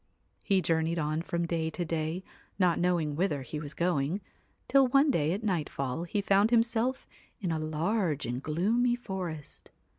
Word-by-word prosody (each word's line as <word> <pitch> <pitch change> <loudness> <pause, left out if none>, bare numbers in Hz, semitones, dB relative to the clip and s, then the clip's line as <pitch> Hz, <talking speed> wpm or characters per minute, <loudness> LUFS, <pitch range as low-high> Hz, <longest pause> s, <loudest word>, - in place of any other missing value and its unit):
He 195 -3 +2
journeyed 165 +1 +1
on 155 0 0
from 170 0 -2
day 165 -1 -1
to 175 +2 -3
day, 160 +2 -2 0.3
not 180 -3 +3
knowing 170 -4 +1
whither 150 -5 0
he 150 +3 -5
was 150 -1 -7
going, 170 0 0 0.5
till 275 -1 +5
one 275 +3 +4
day 155 - +1
at 200 +5 -2
nightfall 160 - -2
he 205 +4 -1
found 200 +2 +4
himself 235 +2 +1 0.3
in 180 -5 -2
a 160 - -1
large 155 +1 0
and 125 +2 -3
gloomy 220 - +1
forest. 185 -10 -6
170 Hz, 160 wpm, -30 LUFS, 155-200 Hz, 0.5 s, till